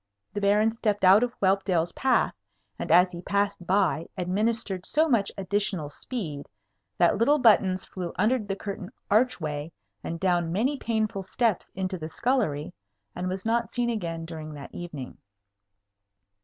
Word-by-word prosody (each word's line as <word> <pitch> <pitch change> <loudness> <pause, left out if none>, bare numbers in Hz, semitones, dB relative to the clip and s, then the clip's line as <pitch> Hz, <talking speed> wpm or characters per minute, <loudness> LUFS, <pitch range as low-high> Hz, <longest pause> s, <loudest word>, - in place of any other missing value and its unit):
The 205 - -3
Baron 210 +2 +4
stepped 210 -3 -1
out 190 +3 +8
of 245 0 -2
Whelpdale's 190 -3 +2
path, 260 +6 +2 0.5
and - - -3
as 180 +1 +6
he 175 -1 -7
passed 200 -2 -1
by 185 -4 +2
administered 195 +1 -1
so 310 +9 +2
much 225 -8 +2
additional 190 -5 -1
speed 155 - -5 0.5
that 175 +3 +3
little 285 +6 +4
Buttons 200 -7 +4
flew 180 -3 -5
under 225 +7 +2
the 205 -3 -4
curtained 195 -2 -6 0.2
archway 165 -10 +1 0.3
and 165 - -4
down 175 -3 +1
many 240 +11 +1
painful 220 -6 -1
steps 220 +1 0
into 185 -1 -3
the 155 0 -5
scullery, 185 - 0 0.4
and 180 +1 -2
was 185 +2 -4
not 230 +1 0
seen 240 -1 +1
again 165 -7 -3
during 155 -2 -7
that 140 -1 -10
evening. 150 -7 -7
195 Hz, 150 wpm, -27 LUFS, 175-220 Hz, 0.5 s, out